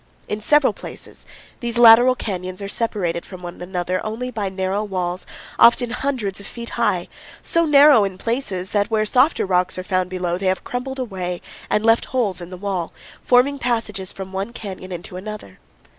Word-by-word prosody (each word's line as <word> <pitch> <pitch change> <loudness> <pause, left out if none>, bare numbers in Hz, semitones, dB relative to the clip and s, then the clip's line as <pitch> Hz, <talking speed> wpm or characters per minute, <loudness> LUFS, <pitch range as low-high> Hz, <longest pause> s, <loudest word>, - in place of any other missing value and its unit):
In 210 0 -3
several 295 +5 +4
places - - -11 0.3
these 240 -1 -3
lateral 240 +2 +8
canyons 185 -5 -5
are 200 - -5
separated 200 -6 -2
from 185 -2 -11
one 175 0 -8
another 180 0 -2
only 235 +4 -4
by 205 -5 -2
narrow 190 +2 -2
walls, 185 -3 -3 0.3
often 235 0 +6
hundreds 245 -7 -2
of 200 - -9
feet 235 -1 -8
high, - - 0 0.4
so 335 0 +2
narrow 290 -6 +7
in 195 -2 -3
places 195 -6 -3
that 205 -1 +1
where 215 -1 +1
softer 255 +6 +3
rocks 185 -1 +1
are 185 - -4
found 185 -1 0
below 180 -1 -2
they 195 - -1
have 185 0 0
crumbled 265 +2 -4
away 185 -8 -4 0.3
and 210 - +1
left 225 0 +4
holes 210 -9 -1
in 175 - -8
the 185 - -8
wall, 185 -3 -3 0.3
forming 265 +3 +3
passages 225 -6 -2
from 190 0 -8
one 195 +5 -3
canyon 190 -4 -8
into 180 +2 -7
another. 195 - -8
200 Hz, 180 wpm, -21 LUFS, 185-240 Hz, 0.4 s, lateral